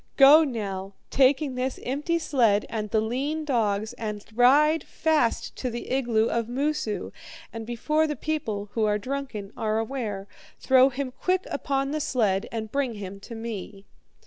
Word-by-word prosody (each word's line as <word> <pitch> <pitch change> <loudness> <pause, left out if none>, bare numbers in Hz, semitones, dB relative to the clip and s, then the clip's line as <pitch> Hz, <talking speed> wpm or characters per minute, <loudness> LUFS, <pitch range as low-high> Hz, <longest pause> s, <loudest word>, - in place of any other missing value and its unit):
'Go 290 +3 +9
now, 200 -7 -4 0.2
taking 270 +1 +3
this 255 +1 -2
empty 295 +6 -1
sled 235 -10 +2
and 215 -2 -3
the 220 - +2
lean 280 +8 -2
dogs, 215 -6 0
and 210 -2 -4
ride 285 +6 +5
fast 310 -8 0
to 255 - -2
the 235 0 -6
igloo 235 -4 +2
of 230 -1 -1
Moosu; 270 -3 -2 0.4
and 225 -1 -6
before 305 +7 +1
the 300 - -2
people, 220 -12 -3
who 225 - -1
are 210 0 +2
drunken, 235 -4 -5
are 215 -1 -1
aware, 220 -4 -3 0.3
throw 260 0 +5
him 265 0 -4
quick 370 +7 -1
upon 275 -1 -1
the 305 - -1
sled 210 -8 +1
and 220 -2 -4
bring 275 -5 -1
him 200 -1 -7
to 230 +4 -9
me.' 210 -3 -7
240 Hz, 160 wpm, -26 LUFS, 215-280 Hz, 0.4 s, Go